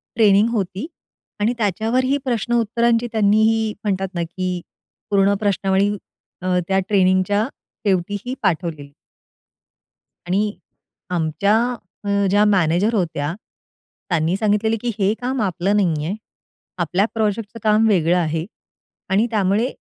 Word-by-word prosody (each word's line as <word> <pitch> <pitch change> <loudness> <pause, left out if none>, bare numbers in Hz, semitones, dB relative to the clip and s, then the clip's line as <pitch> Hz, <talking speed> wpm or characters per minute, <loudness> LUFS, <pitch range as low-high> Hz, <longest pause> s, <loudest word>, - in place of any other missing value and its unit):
Training 210 0 +5
होती 205 - -2 0.5
आणि 220 +4 +1
त्याच्यावर 220 +4 0
ही 275 +2 +2
प्रश्न 240 -2 -1
उत्तरांची 235 +1 +1
त्यांनी 215 -1 +3
ही 220 -1 0
म्हणतात 195 -2 -1
ना 170 -1 -1
की 180 +1 -3 0.5
पूर्ण 200 0 +4
प्रश्नावळी 200 -1 +1 0.5
अ, 180 0 +1
त्या 190 0 +2
ट्रेनिंगच्या 190 +1 +3 0.4
शेवटीही 205 +5 -1
पाठवलेली. 160 -6 -2 1.3
आणि 205 +3 +1 0.6
आमच्या 180 +5 +1 0.5
अ, - - -2 0.2
ज्या 205 +2 +4
मॅनेजर 195 +2 +2
होत्या, 160 -5 -1 0.8
त्यांनी 170 +1 +1
सांगितलेलं, 215 +1 +1
"की 245 - -1
हे 195 +2 +3
काम 255 0 -1
आपलं 190 0 0
नाही 160 -6 +1
आहे. 190 +5 -2 0.6
आपल्या 180 +4 +1
प्रोजेक्टचं 220 0 -2
काम 215 +1 +4
वेगळं 175 -4 +3
आहे 160 -1 -1 0.6
आणि 210 +5 +2
त्यामुळे, 210 +2 +2
200 Hz, 120 wpm, -20 LUFS, 180-220 Hz, 1.3 s, Training